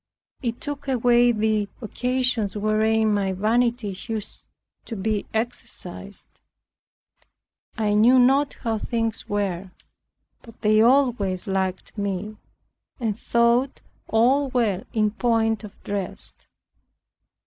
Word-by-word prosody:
It 235 -2 -3
took 290 -2 -6
away 245 -1 +4
the 215 -2 0
occasions 250 -3 -1
wherein 215 +1 +2
my 195 -2 0
vanity 225 +1 +1
used 215 -2 -5 0.4
to 230 - -6
be 210 +1 -2
exercised. 230 +2 -6 1.4
I 210 -2 +1
knew 230 +5 +6
not 270 +3 +4
how 225 -2 -1
things 225 0 -2
were; 195 -3 -2 0.7
but 230 -3 -16
they 215 0 +4
always 235 -7 +2
liked 190 -2 -2
me, 200 +1 -3 0.6
and 225 -4 -1
thought 235 +3 +2 0.3
all 260 +6 +3
well 220 -7 0
in 215 -2 +1
point 225 -1 +1
of 210 -1 -11
dress. 200 -2 -4
220 Hz, 105 wpm, -24 LUFS, 205-245 Hz, 1.4 s, knew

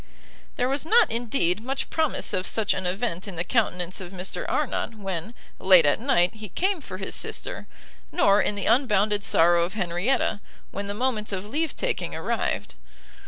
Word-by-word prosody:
There 250 - 0
was 275 +2 0
not, 440 - +4
indeed, 220 -5 0
much 265 +3 -4
promise 315 -3 0
of 185 0 -1
such 220 -2 +1
an 185 - -2
event 190 -1 -2
in 195 - -7
the 170 - -1
countenance 185 -5 -1
of 180 -1 -8
Mr 185 0 -5
Arnott, 230 - -1
when, 195 +1 -5 0.2
late 185 -4 +7
at 145 - +3
night, 230 -8 +2
he 215 -2 -9
came 375 - 0
for 185 - -8
his 190 - -5
sister, - - -3 0.4
nor 210 - +4
in 210 - 0
the 200 - -3
unbounded 210 -5 +2
sorrow 170 -1 +4
of 180 +4 -4
Henrietta, 195 +4 0 0.3
when 200 0 -5
the 200 - -4
moment 225 -3 -1
of 195 0 -3
leave 305 +8 -2
taking - - -2
arrived. - - -2
205 Hz, 175 wpm, -25 LUFS, 185-250 Hz, 0.4 s, late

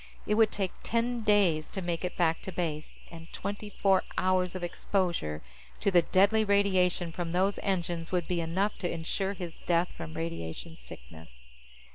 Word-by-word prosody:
It 210 - +1
would 220 0 +4
take 195 -3 -1
ten 235 +1 0
days 195 -8 +3
to 195 - -4
make 175 -2 -2
it 180 - -3
back 165 -2 +2
to 190 - -6
base, 160 -4 -3
and 165 0 -11
twenty 205 +2 -5
four 195 -2 +2
hours 185 -1 +1
of 185 - -4
exposure 170 - -1 0.4
to 200 - +1
the 175 -2 +6
deadly 200 +6 +4
radiation 190 -4 +2
from 170 0 -4
those 190 +3 +2
engines 175 -4 -1
would 180 -3 0
be 175 -2 0
enough 185 +6 -1
to 175 - -1
insure 180 +4 -2
his 175 -4 -7
death 175 0 +2
from 160 -1 -8
radiation 165 - -5
sickness. 60 - -14
180 Hz, 170 wpm, -29 LUFS, 165-195 Hz, 0.4 s, the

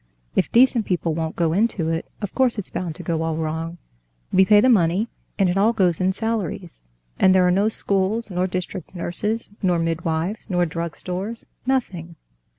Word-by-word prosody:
If - - +1
decent 240 -2 +4
people 175 -3 0
won't 160 0 -3
go 165 -2 +1
into 195 -4 +1
it, 165 0 -2 0.2
of 205 - -4
course 255 -3 +2
it's 205 - -5
bound 170 -4 -4
to - - -8
go 165 -2 -1
all 160 -1 -1
wrong. 160 +1 -3 0.6
We 190 - +6
pay 210 +1 +6
the 240 - +4
money, 200 -1 +3 0.3
and 195 -2 +3
it 180 +2 0
all 215 +4 +4
goes 185 -6 +1
in 185 +1 +3
salaries, 205 - -3 0.4
and 190 0 +5
there 185 -1 +5
are - - +3
no 200 +4 +2
schools, 205 +1 +1
nor 180 +1 0
district 185 0 -5
nurses, 210 +6 -2
nor 180 -3 +2
midwives, 165 +4 -2
nor 180 -2 +2
drugstores—nothing." 180 - -4
185 Hz, 175 wpm, -22 LUFS, 165-210 Hz, 0.6 s, We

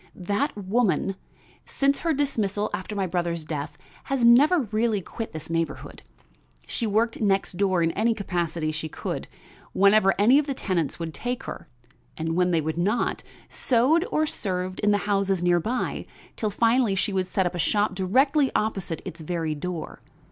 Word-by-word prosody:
That 205 +9 -2
woman, 195 -1 0 0.5
since 275 0 +1
her 335 - 0
dismissal 215 -8 -1
after 205 +1 -4
my 195 -2 0
brother's 170 -2 -2
death, 150 -1 -5 0.3
has 270 -3 +1
never 290 +8 +6
really 220 -1 +1
quit 225 +5 -6
this 155 -1 -7
neighborhood. 165 0 -3 0.6
She 230 - -2
worked 225 +3 0
next 195 -3 +1
door 190 -3 +2
in 165 - +2
any 225 +4 +1
capacity 170 -5 -2
she 155 +1 -4
could, - - -5 0.5
whenever 200 0 +4
any 245 +8 +6
of 300 - -2
the 275 - -2
tenants 175 - -1
would 165 -2 -5
take 245 - -4
her; - - -7 0.5
and 160 +1 -2
when 180 0 +2
they 165 -2 +2
would 160 +2 -3
not, 210 +7 0 0.3
sewed 265 +7 +2
or 310 - +2
served 185 -8 -3
in 210 - +2
the 205 - +4
houses 195 -3 +1
near 175 0 +4
by 240 +8 -3 0.3
till 215 - -1
finally 230 0 +2
she 195 -1 0
set 185 +1 -1
up 175 - -1
a 175 - -4
shop 205 +3 +1
directly 265 - +2
opposite 195 -7 -2
its 170 - -7
very 160 -1 -2
door. 165 +2 -6
195 Hz, 170 wpm, -25 LUFS, 175-230 Hz, 0.6 s, never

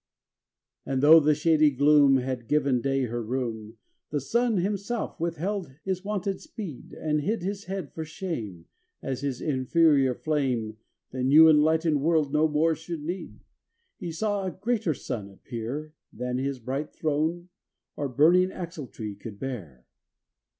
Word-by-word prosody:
vn - - -2
And, 130 +1 0
though 160 +3 +9
the 150 0 +3
shady 155 0 +4
gloom 145 0 +5
Had 125 -2 -3
given 140 -3 +2
day 135 0 0
her 120 -1 -2
room. 115 -2 -4 0.3
The 150 - -1
Sun 235 - +1
himself 200 +5 -2
withheld 170 -1 -3
his 190 -1 -2
wonted 200 -1 -2
speed, 215 - -8
And 150 -1 0
hid 205 +5 -1
his 200 +2 -4
head 190 -5 -5
for 160 - -4
shame, 150 - -6 0.4
As 135 -1 -3
his 140 -3 -3
inferior 140 -1 +3
flame 125 -9 -1 0.3
The 130 - -4
new 150 +5 +7
enlightened 155 0 +4
world 155 -2 +2
no 155 +1 +4
more 155 +2 +2
should 160 0 -6
need: 175 +4 -6 0.6
He 170 - -4
saw 205 +4 -1
a 190 - -1
greater 205 - -1
Sun 110 -6 -5
appear 125 +9 -6 0.2
Than 125 +2 -3
his 135 0 -2
bright 135 +5 -4
Throne 160 +3 -1 0.5
or 145 - -3
burning 170 +8 +4
axletree 150 - -6
could 105 -3 -8
bear. 95 - -7
150 Hz, 150 wpm, -27 LUFS, 130-170 Hz, 0.6 s, though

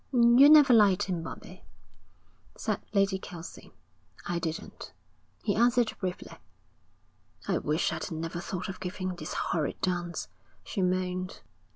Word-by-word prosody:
'You 245 +2 +7
never 295 -4 +8
liked 205 -5 +5
him, 180 -3 -2
Bobbie,' 165 - -9 1.0
said - - -2
Lady 195 -1 +2
Kelsey. 175 -3 -10 0.5
'I 175 -1 -2
didn't,' 165 -2 -6 0.5
he 205 - +1
answered 240 +1 +3
briefly. 185 -2 -5 1.1
'I - - +1
wish 155 +3 0
I'd 160 - -4
never 165 +1 -4
thought 180 0 -5
of 190 - -7
giving 185 0 -4
this 175 - -6
horrid 155 -4 -2
dance,' 175 -2 -2 0.4
she 200 - -4
moaned. 185 0 -1
185 Hz, 130 wpm, -29 LUFS, 175-210 Hz, 1.1 s, never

